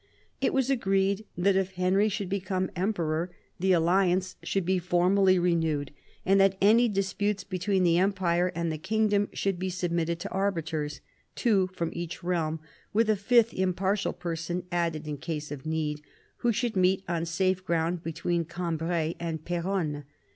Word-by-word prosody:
It - - +2
was 265 0 +1
agreed 195 -3 +1
that 190 +2 +3
if 190 -1 0
Henry 185 +3 +2
should 200 -1 -3
become 185 -1 -2
emperor 175 -3 -1 0.3
the 190 +2 +2
alliance 180 +1 +2
should 195 -3 -1
be 185 +1 +2
formally 185 +2 +3
renewed, 160 -5 +1 0.3
and 195 +1 +5
that 195 0 +3
any 230 +4 +5
disputes 200 0 -1
be 185 -2 -5
tween 190 0 +1
the 170 -1 +4
Empire 180 -2 +1
and 170 -1 -1
the 155 - -4
kingdom 205 +2 +1
should 195 -3 -1
be 185 0 -2
submitted 170 -2 -1
to 200 - -5
arbiters 165 -6 -2 0.2
— - - -41
two 200 -6 +2
from 170 -3 -4
each 170 0 -6
realm, 165 -3 -1 0.3
with 220 +1 +3
a - - +3
fifth 230 +3 +3
impartial 190 +2 0
person 175 0 -4
added 165 -3 -1
in 150 -1 -3
case 150 -1 -4
of 145 +1 -6
need 155 -2 -2 0.2
— - - -36
who 240 - +1
should 235 0 -1
meet 185 +1 +3
on 170 -1 -1
safe 185 +2 0
ground 170 -1 0
between 165 +1 -1
Cambrai 165 -1 -2
and 160 -2 -4
Peronne. 170 -4 -2
180 Hz, 170 wpm, -28 LUFS, 170-195 Hz, 0.3 s, and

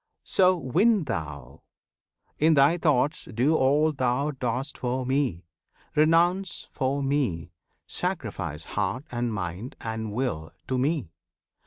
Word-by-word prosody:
So 185 -1 +4
win 185 - +3
thou! 75 - -5 0.8
In 160 +1 +5
thy 145 +5 +5
thoughts 150 -2 +1
Do 125 +7 +1
all 150 +3 +3
thou 135 +1 0
dost 130 +1 -3
for 125 +1 -1
Me! 130 - 0 0.5
Renounce 170 +5 +2
for 140 +1 -1
Me! 130 - -1 0.3
Sacrifice 75 +2 -3
heart 105 - -2
and 120 -1 -1
mind 100 - -5
and 110 -1 -4
will 105 -10 -3 0.2
to 130 -1 +1
Me! 140 - 0
130 Hz, 120 wpm, -26 LUFS, 110-150 Hz, 0.8 s, In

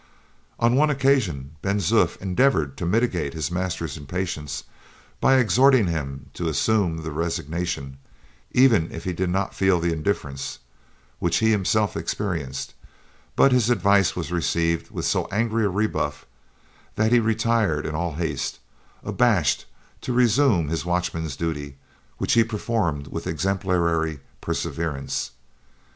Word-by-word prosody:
On 120 +1 +3
one 150 +3 +4
occasion 130 - +1
Ben 100 +1 0
Zoof 95 -2 +2
endeavored 95 - +1
to 85 - -3
mitigate 90 - 0
his 80 -2 -2
master's 85 -4 -3
impatience 75 -2 -4 0.6
by 135 - +4
exhorting 130 0 +5
him 70 -6 -4
to 85 - -3
assume 90 0 +1
the 80 - -4
resignation, 80 -3 -3 0.5
even 115 -10 +4
if 80 - -7
he 90 - -2
did 90 +1 -1
not 95 +2 -1
feel 95 -2 +2
the 85 0 0
indifference, 75 -5 -3 0.6
which 85 -1 +1
he 110 0 +3
himself 105 +1 +1
experienced; 80 -10 -3 0.6
but 135 - +5
his 125 -2 +3
advice 100 -4 +3
was 85 -3 -4
received 85 -1 0
with - - -4
so - - +1
angry 110 +1 +1
a - - +2
rebuff 105 +3 -1 0.7
that 110 +1 +2
he 120 - +6
retired 110 -7 +1
in 80 - -3
all 85 +1 -2
haste, 80 0 -2 0.5
abashed, 100 - +2 0.3
to 125 - -3
résumé 120 - +3
his 80 - -1
watchman's 85 -4 -2
duty, 75 -3 -4 0.4
which - - 0
he 115 - +6
performed 105 -9 -2
with - - -5
exemplary 85 -5 0 0.2
perseverance. 80 -5 -3
90 Hz, 135 wpm, -24 LUFS, 80-110 Hz, 0.7 s, he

